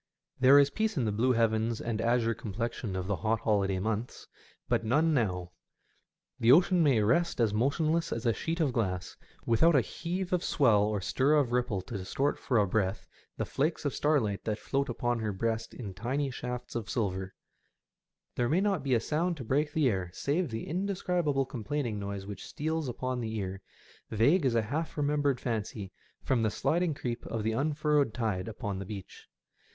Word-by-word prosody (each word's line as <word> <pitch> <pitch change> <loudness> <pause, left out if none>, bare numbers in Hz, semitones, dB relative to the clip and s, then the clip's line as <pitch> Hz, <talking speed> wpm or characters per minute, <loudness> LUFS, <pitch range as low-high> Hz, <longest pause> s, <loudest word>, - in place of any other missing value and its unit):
There 130 +2 +7
is 140 0 +5
peace 220 -3 -1
in 125 - +1
the 105 - +1
blue 120 +5 +2
heavens 115 -1 +1
and 110 -2 -2
azure 115 0 +2
complexion 110 -1 -4
of 95 -1 -2
the 100 0 -1
hot 110 0 0
holiday 100 -3 +1
months, 110 +4 -3 0.4
but - - +1
none 150 +8 +2
now. 90 -9 0 0.9
The 115 - +5
ocean 175 +4 +5
may 135 -9 +4
rest 170 +10 +2
as 110 -3 +2
motionless 155 +8 +1
as 115 - -3
a 115 - +3
sheet 165 +8 -3
of 145 -6 +1
glass, 95 -6 -2 0.3
without 150 +9 +4
a 135 - +6
heave 180 - -4
of 180 0 +1
swell 115 -8 +4
or 105 -1 0
stir 135 +10 +2
of 140 -5 +2
ripple 120 -6 0
to 105 -1 -6
distort 135 +10 -1
for 125 - 0
a 105 - +4
breath 95 0 -1 0.3
the - - -1
flakes 155 +3 -1
of 145 - 0
starlight 130 -10 +1
that 105 -1 -1
float 140 +4 -1
upon 120 0 -1
her 110 -1 -1
breast 115 +3 -2
in 105 -6 -7
tiny 130 +7 -2
shafts 125 0 -5
of 115 -2 -4
silver; 95 -5 -2 1.0
there 120 -1 +1
may 165 - +3
not 195 -4 +1
be 135 -2 +1
a - - +3
sound 165 +7 -1
to 130 - -6
break 145 +6 0
the 150 -2 +2
air 95 -6 -1
save 160 +4 0
the 115 -1 -4
indescribable 180 -6 0
com 125 -4 -7
plaining 125 -6 -2
noise 100 -1 -5
which 100 -2 -8
steals 160 -1 -2
upon 125 +1 -3
the 110 -1 -3
ear, 95 -2 -4 0.5
vague 135 - +3
as 120 - +1
a 115 - +3
half 155 +10 -3
remembered 145 -3 +1
fancy, 105 -5 -3 0.3
from 130 -3 +1
the 110 - +2
sliding 165 +7 0
creep 120 -3 -4
of 115 -2 -3
the 110 - +1
unfurrowed 150 0 +1
tide 105 -6 -1
upon 105 -3 -4
the 100 - -5
beach. 100 -3 -9
120 Hz, 190 wpm, -30 LUFS, 110-145 Hz, 1.0 s, There